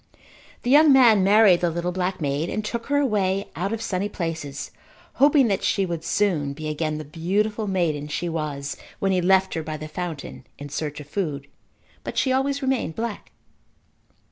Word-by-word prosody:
The 245 - 0
young 300 +1 +7
man 235 -7 +6
married 200 -2 +5
the 175 - +2
little 170 +2 -2
black 185 +1 -2
maid 145 +2 -1
and 215 - -3
took 230 +1 -4
her 285 0 +1
away 200 -7 +1
out 185 +5 -2
of 225 -1 -3
sunny 195 +2 -2
places 160 -7 -5 0.5
hoping 285 -2 +6
that 195 -1 0
she 195 - +1
would 170 -3 -4
soon 170 -7 0
be 155 +1 -5
again 155 0 -2
the 155 - -6
beautiful 205 +8 -1
maiden 165 -6 -1
she 150 +3 -3
was 150 -4 -3 0.2
when 195 - 0
he 185 -1 +2
left 190 +1 +3
her 165 - -2
by 155 0 -5
the 155 +1 -7
fountain 155 -5 -6
in 145 0 -8
search 150 +1 -4
of 145 - -10
food. 150 -5 -3 0.6
But - - -6
she 260 - +2
always 275 +2 0
remained 260 -11 -1
black. 230 -2 -5
180 Hz, 185 wpm, -24 LUFS, 155-210 Hz, 0.6 s, young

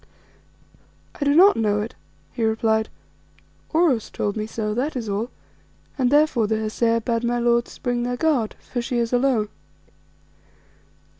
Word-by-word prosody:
"I - - +1
do 285 +1 +3
not 385 +5 +7
know 210 -2 +1
it," 230 +4 -5 0.4
he 235 - -3
replied. 220 0 +1 0.8
"Oros 315 -9 +2
told 205 -1 -2
me 215 -1 -3
so, 215 -1 -3
that 265 +7 -2
is 235 -3 -4
all, 210 +4 -2 0.7
and 255 -3 +1
therefore 290 -6 +3
the 220 +1 0
Hesea 230 +1 0
bade 230 0 -1
my 240 0 0
lords 235 0 +1
bring 245 -1 -1
their 245 +1 -2
guard, 275 -9 +1
for 245 - -4
she 240 +1 -2
is 235 0 -1
alone." 245 -4 +2
235 Hz, 150 wpm, -23 LUFS, 220-255 Hz, 0.8 s, not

